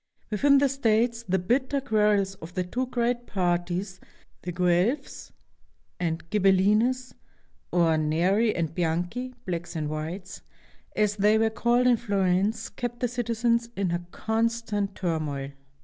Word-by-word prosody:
Within 280 +7 +4
the 280 +1 +4
states 235 -3 +1
the 190 - +3
bitter 255 +9 0
quarrels 210 -6 +2
of 165 +2 -10
the 185 - 0
two 250 +8 -3
great 240 0 -1
parties, 180 +1 -1 0.4
the 180 - -4
Guelphs 180 - 0 0.7
and 165 -1 -2
Ghibel 195 -2 +4
hnes, 235 +7 +2 0.6
or 165 -3 +3
Neri 180 +9 +2
and 165 -2 -2
Bianchi 180 +10 -2
(blacks 170 -1 -4
and 150 -2 -2
whites), 175 +6 -6 0.5
as 210 -1 +1
they 210 +2 +4
were 220 0 +2
called 240 +3 +2
in 245 -1 +5
Florence, 200 0 0
kept 240 -1 -5
the 245 - +2
citizens 235 0 0
in 175 -3 -1
constant 220 -3 -1
turmoil. 150 -6 -2
205 Hz, 135 wpm, -26 LUFS, 175-235 Hz, 0.7 s, in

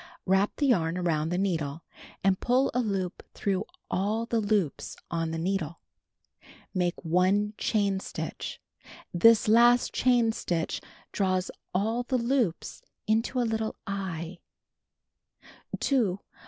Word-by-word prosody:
Wrap 190 +2 +2
the 290 - 0
yarn 175 -10 +2
around 165 -3 0
the 175 - -1
needle, 165 -5 -1 0.4
and 190 0 +3
pull 255 +2 +2
a 250 - +1
loop 195 -6 -2
through 195 0 -1 0.3
all 210 +5 0
the 230 -1 0
loops 205 -7 -1 0.2
on 165 -1 -1
the 165 - -3
needle. 170 -2 -2 0.9
Make 180 -2 -1
1 185 +5 +2
chain 200 -3 +1
stitch. - - -6 0.5
This 220 +6 +6
last 240 +2 +5
chain 245 -3 +3
stitch 170 -6 -2 0.3
draws 185 -2 0 0.2
all 220 +6 0
the 255 +1 0
loops 235 -7 -1 0.2
into 225 +4 +1
a - - +3
little 220 -1 -1
"eye." 185 -3 -4
195 Hz, 120 wpm, -28 LUFS, 175-225 Hz, 0.9 s, This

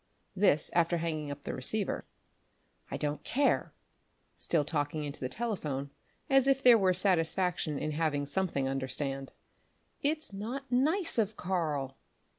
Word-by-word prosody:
_" - - -43 0.3
this 180 -6 +3
after 170 0 +3
hanging 155 -3 -2
up 140 0 -7
the - - -4
receiver. 195 +10 -2 0.8
"I - - -3
don't 150 0 -2
care," 280 +3 +1 0.6
still 155 -4 +1
talking 150 0 -1
into 145 -1 -5
the 130 - -3
telephone, 150 - -3 0.4
as 270 -1 +4
if 270 0 +3
there 245 -2 +9
were 190 -4 +4
satisfaction 180 -3 +1
in 155 - -2
having 150 -2 0
something 145 -3 0
understand 135 0 -2 0.7
"it's 305 -5 -1
not 245 +7 -5
nice 310 - +2
of 215 0 0
Karl." 150 -7 -2
170 Hz, 140 wpm, -31 LUFS, 145-220 Hz, 0.8 s, there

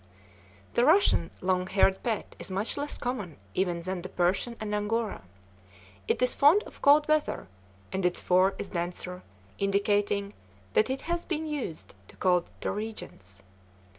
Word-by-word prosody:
The 240 - +3
Russian 310 - +4
long 185 0 +1
haired 190 0 +3
pet 225 -4 -3
is - - -7
much 195 +4 -2
less 290 +1 -3
common 215 - -4 0.2
even 175 -3 0
than 185 0 -3
the 185 - -7
Persian 185 +7 0
and 210 -1 -4
Angora. 210 - -1 0.9
It - - +1
is 250 - +4
fond 315 +10 +5
of - - -14
cold 295 +1 +6
weather, 310 - +1 0.5
and 190 0 -1
its 180 0 +1
fur 185 +2 +3
is 200 - -5
denser, 180 +1 -4 0.4
indicating 200 0 +1 0.4
that 220 - +3
it 265 +1 -2
has 345 0 -2
been 320 -2 -2
used 285 - -5
to - - -15
colder 180 -2 0
regions. 95 - -7
200 Hz, 150 wpm, -28 LUFS, 180-250 Hz, 0.9 s, cold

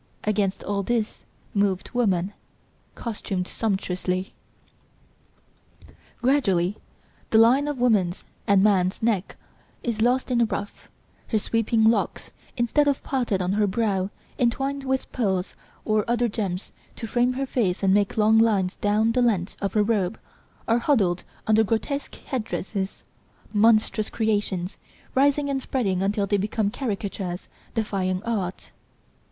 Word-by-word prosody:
Against 200 -2 0
all 200 -1 -1
this 225 +1 -2 0.3
moved 200 -2 0
woman, 200 -5 +1 0.6
costumed 195 -5 -3
sumptuously. 185 -3 -2 1.9
Gradually 205 -9 +2 0.5
the 220 - +4
line 250 +6 +5
of 295 -2 -2
woman's 210 -8 +2 0.2
(and 200 -1 +5
man's) 190 -1 +2
neck 210 -5 0 0.5
is 230 -3 -2
lost 250 +3 +2
in 240 -1 +3
a - - +5
ruff, 205 -2 -5 0.4
her 220 - +1
sweeping 225 +1 +1
locks, 225 +1 +1 0.3
instead 250 +5 +2
of 280 -2 +1
parted 235 -8 0
on 180 +2 0
her 210 0 +2
brow, 195 -2 0 0.3
entwined 270 +3 0
with 265 0 -1
pearls 190 -6 -1 0.3
or 215 -1 +2
other 240 0 +2
gems 200 -4 -3 0.2
to - - -6
frame 245 +2 +1
her 270 +2 -2
face 210 -9 0
and 190 -1 +4
make 205 +1 +2
long 220 +1 +5
lines 200 -5 +2
down 210 +2 +2
the 250 - +2
length 205 -6 +1
of 200 - -1
her 210 - +4
robe, 205 -2 0 0.5
are 230 +1 +3
huddled 205 - +2 0.2
under 220 0 +4
grotesque 230 +7 -2
head 255 -5 -4
dresses, 195 -2 -4 0.5
monstrous 215 0 +3
creations, 205 -4 -1 0.3
rising 285 +2 +3
and 275 -1 -1
spreading 200 -9 -1
until 200 +1 +1
they 205 +1 +1
become 205 +1 0
caricatures, 200 -7 -4 0.3
defying 195 -4 -1
art. 200 -6 -3
215 Hz, 135 wpm, -25 LUFS, 195-235 Hz, 1.9 s, line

